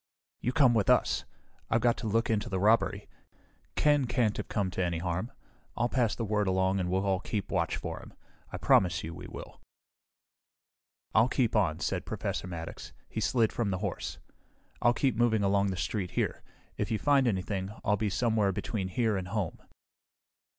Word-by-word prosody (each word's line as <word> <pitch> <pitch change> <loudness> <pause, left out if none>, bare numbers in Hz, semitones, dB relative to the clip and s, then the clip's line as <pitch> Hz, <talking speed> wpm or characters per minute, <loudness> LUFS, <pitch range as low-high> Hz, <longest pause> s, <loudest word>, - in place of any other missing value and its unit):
"You 125 - -1
come 135 -4 +5
with 110 -4 +1
us. - - +3 0.4
I've 115 - +2
got 120 -1 +3
to 115 - -4
look 115 +2 +1
into 105 -2 0
the 95 - -1
robbery. 110 +4 +2 0.7
Ken 145 -3 +3
can't 115 -3 +1
have - - -4
come 100 -4 -1
to 95 - -1
any 85 -1 -1
harm. 90 +7 -2 0.5
I'll 120 0 +1
pass 120 -4 +1
the 115 - -3
word 105 -1 0
along 95 +1 +2
and 90 -1 -1
we'll 95 +2 0
all 95 -1 +1
keep 100 0 -4
watch - - 0
for - - -5
him. - - -13 0.4
I - - -4
promise 90 -1 +3
you 80 - -5
we - - -9
will." - - -10 1.5
"I'll 110 +3 +5
keep 125 -5 +1
on," 90 -8 +2
said - - -1
Professor - - -3
Maddox. 85 -2 -7 0.2
He - - -4
slid 115 0 +2
from 115 -4 -1
the 95 - -1
horse. 100 -1 -4 0.6
"I'll 120 - +5
keep 130 -3 +1
moving 110 -2 +2
along 100 0 +3
the 95 -2 -2
street 95 -1 -2
here. - - -1 0.4
If - - -1
you 110 - +1
find 140 +1 +3
anything, 95 -2 -1 0.2
I'll 105 0 +3
be 105 0 -1
somewhere 110 0 +2
between 95 0 -3
here 110 +3 0
and 95 -1 -4
home." 100 -3 -3
105 Hz, 185 wpm, -30 LUFS, 95-115 Hz, 1.5 s, come